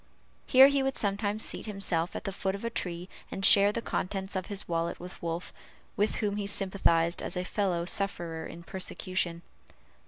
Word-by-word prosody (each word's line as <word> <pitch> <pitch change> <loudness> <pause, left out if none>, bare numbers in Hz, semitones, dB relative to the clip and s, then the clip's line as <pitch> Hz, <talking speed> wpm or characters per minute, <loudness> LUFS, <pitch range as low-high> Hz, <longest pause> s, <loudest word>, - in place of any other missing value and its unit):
Here 265 +1 +9
he 280 -1 +2
would 270 0 -1
sometimes 205 +1 -1
seat - - -4
himself 190 -5 0
at - - -4
the 195 - -3
foot 190 0 -2
of 200 - -7
a 230 - -2
tree, 180 -4 -3 0.2
and 195 - 0
share 200 0 +8
the 230 +2 -4
contents 190 +1 -3
of 185 -1 -2
his 205 -1 -1
wallet 170 0 -2
with 180 +1 -10
Wolf, 170 +1 -4 0.4
with 210 +2 +1
whom 205 -2 -1
he 205 -1 -2
sympathized 185 -4 +2
as - - -3
a 180 - -1
fellow 180 -4 -1
sufferer 170 -4 -2
in 170 +1 -10
persecution. 185 -1 -3
190 Hz, 185 wpm, -29 LUFS, 170-205 Hz, 0.4 s, Here